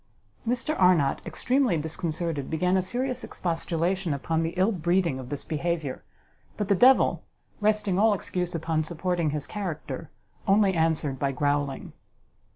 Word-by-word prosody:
Mr 245 +5 0
Arnott, 170 -7 +4
extremely 255 -8 +1
disconcerted, 160 -1 -3
began 180 +4 +1
a 190 - +3
serious 250 +6 -2
expostulation 170 0 -1
upon 160 +4 -1
the 165 +2 -2
ill 190 +4 +3
breeding 175 -5 +1
of 125 -1 -8
this 145 - -4
behaviour; 160 -3 -2 0.5
but 210 -1 -2
the - - +6
devil, 255 +7 +5 0.4
resting 210 -3 +1
all 215 0 +5
excuse 180 -2 -2
upon 160 -1 0
supporting 170 0 -1
his 150 -1 -2
character, 165 -10 -5 0.4
only 195 -1 +4
answered 160 -5 +1
by 140 0 +1
growling. 145 0 -1
170 Hz, 140 wpm, -26 LUFS, 155-195 Hz, 0.5 s, the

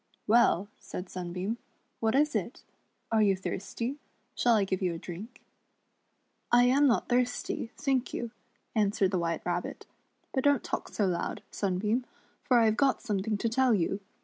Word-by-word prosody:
"Well," 215 -4 +4
said 180 0 -7
Sunbeam, 185 +5 -3 0.4
"what 225 +2 +1
is 300 +2 +3
it? - - -3 0.5
Are 220 -1 +4
you 195 -2 +4
thirsty. 230 +8 -4 0.2
* 235 +4 -43
Shall 240 -2 +4
I 210 - +3
give 190 0 -2
you 180 -3 0
a - - -4
drink. 190 +9 -9 0.3
*" - - -46
" - - -46 0.3
I 240 0 +7
am 270 +4 +5
not 240 - +2
thirsty, 245 -1 0
thank 270 -3 0
you," 235 -1 -4 0.4
answered 205 -3 +2
the 185 - +1
WMiite 165 -1 -2
Rabbit; 175 0 -3 0.5
"but 265 - 0
don't 285 -3 +4
talk - - -3
so 210 - 0
loud, 180 -2 -2
Sunbeam, 210 +5 0 0.4
for 250 - +4
I 230 - +5
have 220 0 +2
got 275 -2 +2
something 210 -2 -1
to 230 - -1
tell 250 0 +3
you. 195 +1 0
220 Hz, 175 wpm, -30 LUFS, 190-245 Hz, 0.5 s, I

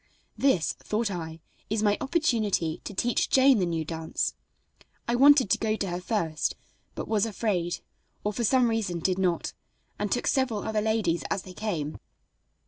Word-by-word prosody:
This, 265 - +2
thought 215 0 -2
I, 160 -3 -6 0.3
is 215 0 0
my 205 -1 +4
opportunity 220 - 0
to - - -5
teach 240 +5 +1
Jane 265 -3 +5
the 180 - +1
new 165 -2 -2
dance. 160 0 -2 0.7
I 235 - +1
wanted 270 -3 +6
to 220 - +3
go 215 -1 0
to 200 -3 -3
her 175 +1 -3
first, 170 -6 -1 0.4
but - - -5
was 220 0 +1
afraid, 190 -5 -1 0.4
or 210 - -1
for 235 - -2
some 250 +2 +4
reason 220 -6 -1
did 185 +3 0
not, 180 -3 0 0.5
and - - -2
took - - 0
several 260 -6 +1
other 220 -1 0
ladies 210 -8 +1
as 200 -2 -1
they 185 - -10
came. 170 -9 -3
210 Hz, 170 wpm, -27 LUFS, 175-225 Hz, 0.7 s, wanted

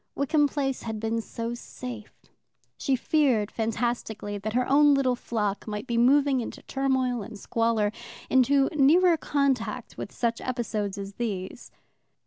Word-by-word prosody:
Wickham 290 +1 +2
Place 275 -2 -2
had 220 -1 -4
been 225 +1 -1
so 230 +1 -5
safe. 240 -2 -9 0.5
She 270 - 0
feared, 255 -6 +1
fantastically, 225 -2 -2
that 215 +2 -4
her 250 +1 +1
own 290 +1 +5
little 260 -2 +2
flock 210 -4 -3
might 210 -1 -4
be 235 - -2
moving 270 +2 +4
into - - -7
turmoil 260 -3 0
and 210 +1 -8
squalor, 225 -1 0 0.4
into 270 +1 +4
nearer 330 +5 +5
contact 260 -6 -1
with 200 - -5
such 235 -1 -1
episodes 220 -5 -3
as 200 0 -6
these. 205 -3 -4
240 Hz, 140 wpm, -27 LUFS, 220-270 Hz, 0.5 s, own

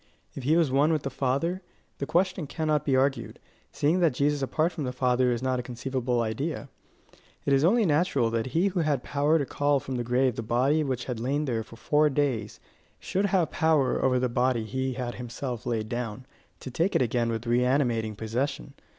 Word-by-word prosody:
If - - -7
he 155 +4 +4
was 160 -6 +2
one 145 +4 +3
with 155 -3 0
the 135 - -3
Father, 140 +9 -1 0.4
the 140 - -3
question 180 -2 0
cannot 155 0 -1
be 135 - +2
argued, 135 -2 0 0.3
seeing 155 +5 +1
that 165 -7 +2
Jesus 145 +1 +1
apart 155 +6 0
from 160 - -5
the 125 - -2
Father 125 0 +2
is 120 +1 -2
not 130 -1 0
a - - -1
conceivable 125 0 -2
idea. 135 +6 -3 0.8
It 140 - +2
is 135 +1 +3
only 215 +6 +4
natural 145 -7 +2
that 115 +1 -1
he 170 +9 +1
who 185 -1 -2
had 150 -6 0
power 145 +3 +2
to 145 - -1
call 145 +1 +1
from 130 -1 -5
the 120 - -2
grave 125 0 +1
the - - -1
body 130 +7 +1
which 130 -4 -3
had 125 -3 -4
lain 140 +5 -1
there 120 -5 -1
for 110 - -12
four 150 +6 +2
days, 130 -7 -1 0.4
should 195 +2 -1
have 185 -4 +1
power 155 -5 +2
over 130 -1 +3
the 125 0 +1
body 125 -1 +1
he 130 +3 -2
had 125 -1 -4
himself 120 0 -5
laid 110 -2 -1
down, 120 +1 -4 0.4
to 130 - -7
take 170 +9 0
it - - +4
again 120 0 0
with 115 +1 -3
reanimating 120 -2 +1
possession. 110 - -3
130 Hz, 205 wpm, -27 LUFS, 120-150 Hz, 0.8 s, he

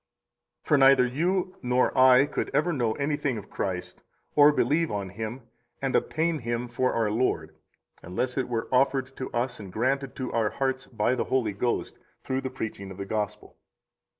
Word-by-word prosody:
38 - - -22
For 150 - +5
neither 135 -1 +6
you 180 +8 -1
nor 125 0 +1
I 130 0 +7
could - - -3
ever 160 +4 +2
know 120 -6 0
anything 145 -2 -1
of 105 - -10
Christ, 90 -2 -4 0.3
or 145 0 +8
believe 150 +4 +1
on 100 -2 -3
Him, 110 +6 -6 0.4
and 135 -1 -1
obtain 160 0 +1
Him 120 0 -3
for 125 +1 0
our 110 -2 +1
Lord, 105 -9 -1 0.5
unless 125 +9 -3
it 130 -2 -1
were 115 -2 -2
offered 135 0 +2
to 130 - -5
us 120 +1 -2
and 100 -3 -9
granted 130 +6 -1
to 130 -1 -4
our 110 -2 +2
hearts 130 +1 -2
by 115 +1 0
the 130 - -1
Holy 120 -6 0
Ghost 120 +4 -2 0.2
through 130 0 -1
the 130 - -3
preaching 110 -6 -6
of 95 - -9
the 100 - -5
Gospel. 105 0 -4
125 Hz, 180 wpm, -27 LUFS, 110-135 Hz, 0.5 s, or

